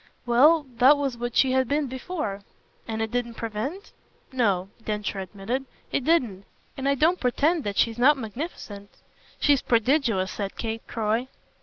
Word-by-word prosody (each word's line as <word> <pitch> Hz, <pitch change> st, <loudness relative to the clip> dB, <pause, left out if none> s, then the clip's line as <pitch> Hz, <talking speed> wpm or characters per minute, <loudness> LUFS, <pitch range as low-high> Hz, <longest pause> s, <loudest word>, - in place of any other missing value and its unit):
"Well, 290 Hz, +6 st, +5 dB
that 265 Hz, +4 st, +6 dB
was 275 Hz, -3 st, -1 dB
what 240 Hz, 0 st, -5 dB
she 265 Hz, -, +4 dB
had 260 Hz, -1 st, +2 dB
been 290 Hz, +2 st, +1 dB
before." 260 Hz, -, -4 dB, 0.5 s
"And 225 Hz, 0 st, -2 dB
it 220 Hz, -, -4 dB
didn't 240 Hz, -1 st, -2 dB
prevent? 230 Hz, -, -5 dB, 0.4 s
No," 200 Hz, -8 st, +1 dB
Densher 210 Hz, -2 st, -3 dB
admitted, 200 Hz, +8 st, -4 dB, 0.3 s
"it 275 Hz, -, 0 dB
didn't; 245 Hz, -, +1 dB, 0.3 s
and 270 Hz, 0 st, -1 dB
I 280 Hz, -, +3 dB
don't 325 Hz, +6 st, +2 dB
pretend 295 Hz, +6 st, +1 dB
that 200 Hz, -1 st, -3 dB
she's 230 Hz, 0 st, +1 dB
not 285 Hz, +4 st, +5 dB
magnificent." 220 Hz, -, -7 dB, 0.5 s
"She's 285 Hz, -3 st, +3 dB
prodigious," 230 Hz, -5 st, +1 dB
said 200 Hz, -2 st, -5 dB
Kate 225 Hz, -1 st, -3 dB
Croy. 225 Hz, +2 st, -1 dB
240 Hz, 155 wpm, -25 LUFS, 215-280 Hz, 0.5 s, that